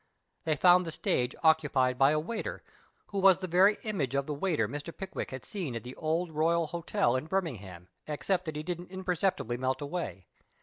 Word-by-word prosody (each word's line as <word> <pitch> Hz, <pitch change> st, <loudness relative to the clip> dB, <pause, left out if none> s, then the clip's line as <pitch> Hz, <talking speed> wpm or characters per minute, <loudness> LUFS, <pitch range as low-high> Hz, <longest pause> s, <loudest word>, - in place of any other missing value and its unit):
They 155 Hz, -1 st, +2 dB
found 180 Hz, +4 st, +6 dB
the 165 Hz, -, -5 dB
stage 125 Hz, -4 st, 0 dB
occu])icd 145 Hz, -5 st, +3 dB
by 135 Hz, 0 st, +6 dB
a 155 Hz, +1 st, +2 dB
waiter, 220 Hz, +8 st, -4 dB, 0.5 s
who 200 Hz, -, -2 dB
was 190 Hz, -2 st, +6 dB
the 190 Hz, -, -5 dB
very 185 Hz, +4 st, +4 dB
image 155 Hz, -, -2 dB
of 140 Hz, 0 st, +1 dB
the 150 Hz, -, -3 dB
waiter 150 Hz, -, 0 dB
Mr. 145 Hz, +6 st, -6 dB
Pickwick 190 Hz, -1 st, -5 dB
had 130 Hz, -1 st, -8 dB
seen 170 Hz, -, -4 dB
at 115 Hz, -, -5 dB
the 125 Hz, +1 st, -8 dB
Old 165 Hz, +2 st, -1 dB
Royal 165 Hz, +2 st, +2 dB
Hotel 170 Hz, -, 0 dB
at 150 Hz, +5 st, -5 dB
Birmingham, 105 Hz, -, -3 dB, 0.2 s
except 180 Hz, +5 st, -1 dB
that 160 Hz, -2 st, -4 dB
he 150 Hz, -, -4 dB
didn't 175 Hz, +1 st, -5 dB
imperceptibly 185 Hz, -, -1 dB
melt 130 Hz, +1 st, -1 dB
away. 140 Hz, -, -4 dB
160 Hz, 190 wpm, -30 LUFS, 135-180 Hz, 0.5 s, found